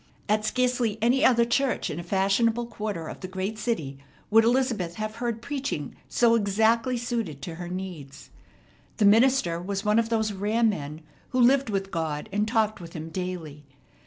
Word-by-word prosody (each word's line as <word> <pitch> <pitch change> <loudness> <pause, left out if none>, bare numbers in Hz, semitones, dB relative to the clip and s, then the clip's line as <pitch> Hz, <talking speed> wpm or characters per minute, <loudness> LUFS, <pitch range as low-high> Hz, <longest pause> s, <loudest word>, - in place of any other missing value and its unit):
At 215 +1 +2
scarcely 245 -2 0
any 245 +4 +3
other 235 -2 +5
church 255 +2 0
in 155 - -5
a - - -5
fashionable 200 +6 +1
quarter 210 -7 -5
of - - -8
the 185 - -6
great 190 +3 -4
city 160 - -2 0.3
would 225 +1 +7
Elizabeth 230 -8 +1
have 215 +2 -4
heard 235 -1 -3
preaching 275 - -4
so 235 -1 +4
exactly 225 +3 +2
suited 230 - -3
to 170 - -5
her 175 - -5
needs. 175 -7 -7 0.7
The 215 - +3
minister 215 -5 +4
was 195 +2 -4
one 210 +2 +4
of 230 0 0
those 220 -2 0
rare 210 +4 0
men 155 -8 -1 0.3
who 255 - -1
lived 260 +1 +4
with 195 -1 -2
God, 160 -4 -3
and 205 +2 0
talked 215 -3 +1
with 170 -1 -10
Him 160 -1 -6
daily. 165 -4 -5
215 Hz, 175 wpm, -26 LUFS, 180-235 Hz, 0.7 s, would